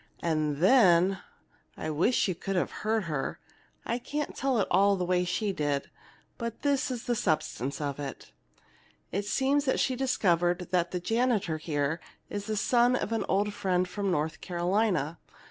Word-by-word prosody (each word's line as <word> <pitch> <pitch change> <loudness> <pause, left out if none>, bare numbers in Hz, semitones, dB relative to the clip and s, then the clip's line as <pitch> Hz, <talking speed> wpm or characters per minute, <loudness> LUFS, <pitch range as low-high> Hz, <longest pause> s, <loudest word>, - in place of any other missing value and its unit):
And 155 -3 0
then 190 - +5 0.6
I 155 - -3
wish 175 +13 +2
you 185 - 0
could 195 +3 -4
have 180 - 0
heard 220 0 +1
her! 150 -6 -3 0.5
I 235 - -1
can't 295 +4 -4
tell 270 -2 0
it 205 - +1
all 200 +2 +5
the 180 -2 -2
way 180 0 +2
she 200 +3 -1
did, 145 -4 -2 0.5
but 235 -1 -5
this 285 -2 +1
is 245 -3 -4
the 240 - 0
substance 155 - -1
of 145 -2 -3
it: 140 -2 -7 0.8
"It 200 +2 -2
seems 275 +6 +1
that 260 - +1
she's 255 -1 0
discovered 175 -8 +1
that 175 -1 +2
the 180 - -3
janitor 220 -5 0
here 150 0 -1 0.3
is 205 0 -4
the 215 -1 -1
son 245 +3 +3
of 230 - -2
an 225 - 0
old 205 +2 +1
friend 185 -2 0
from 200 +1 -2
North 155 -2 -1
Carolina. 175 -3 0
190 Hz, 170 wpm, -29 LUFS, 165-225 Hz, 0.8 s, then